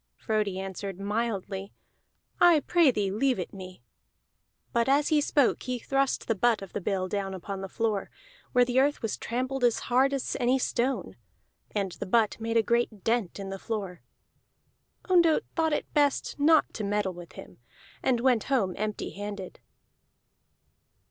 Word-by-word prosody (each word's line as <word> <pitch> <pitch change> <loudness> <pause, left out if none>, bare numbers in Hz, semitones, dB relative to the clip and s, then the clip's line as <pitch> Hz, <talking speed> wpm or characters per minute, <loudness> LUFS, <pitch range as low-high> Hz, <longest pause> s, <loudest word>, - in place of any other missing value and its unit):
Frodi 210 - -1
answered 195 0 -5
mildly: 200 -2 -3 0.7
"I 345 -4 +6
pray 340 -2 +4
thee 205 -6 0
leave 255 +5 +1
it 180 - -5
me." 185 -8 -10 0.9
But 235 +2 +2
as 285 +2 +3
he 305 -1 +3
spoke 285 -3 +2
he 250 0 -3
thrust 270 +2 0
the 225 - +2
butt 225 0 +2
of 195 - -11
the 205 - -3
bill 185 0 -1
down 195 0 -3
upon 195 +1 -6
the 195 - -6
floor, 220 -2 -1 0.4
where 250 -1 +4
the 250 +1 +2
earth 285 0 +1
was 225 - -1
tramped 255 +3 -3
as 240 -2 +4 0.2
hard 265 +2 +4
as 275 -2 -2
any 250 +1 +3
stone; 260 +1 -1 0.6
and 200 -3 0
the - - -6
butt 220 +2 +2
made 225 +1 -1
a 225 - +4
great 235 -3 0
dent 225 -5 0
in 195 -1 -5
the 195 - -5
floor. 195 -6 -4 1.1
Ondott 340 -4 +4
thought 320 -1 +2
it 295 - -2
best 290 -1 +1
not 310 +1 +4
to 215 - -4
meddle 205 -2 0
with 175 -1 -11
him, - - -12 0.4
and 245 -3 +1
went 245 -4 +3
home 225 -10 +1
empty 215 -1 -3
handed. 205 -2 -7
225 Hz, 165 wpm, -28 LUFS, 195-265 Hz, 1.1 s, I